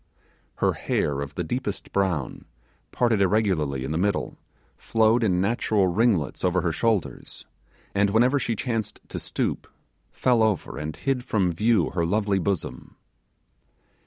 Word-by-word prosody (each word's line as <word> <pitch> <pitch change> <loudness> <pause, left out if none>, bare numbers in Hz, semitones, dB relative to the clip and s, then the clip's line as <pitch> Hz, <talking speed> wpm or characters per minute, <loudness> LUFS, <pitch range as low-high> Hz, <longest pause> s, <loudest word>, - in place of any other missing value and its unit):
Her - - +1
hair 70 -1 -1
of 70 0 -6
the 90 - -2
deepest 105 +3 -4
brown, 90 -9 -1 0.5
parted 115 -4 +2
irregularly 90 -10 +1
in 65 - -4
the 80 - -1
middle, 100 +1 -1 0.4
flowed 115 +1 +2
in 90 -5 +2
natural 105 0 +1
ringlets 90 - +1
over 90 0 +2
her 85 - 0
shoulders, 110 +3 -2 0.5
and 100 0 +2
whenever 125 +7 +3
she 115 -3 -1
chanced 110 -2 -3
to - - -4
stoop, - - -3 0.4
fell 125 -3 +2
over 110 -8 0
and 75 +1 -4
hid 135 -2 -1
from 95 -7 +1
view 105 -1 +2
her 85 -1 -1
lovely 100 +2 +1
bosom. 95 -1 -3
100 Hz, 140 wpm, -25 LUFS, 85-110 Hz, 0.5 s, whenever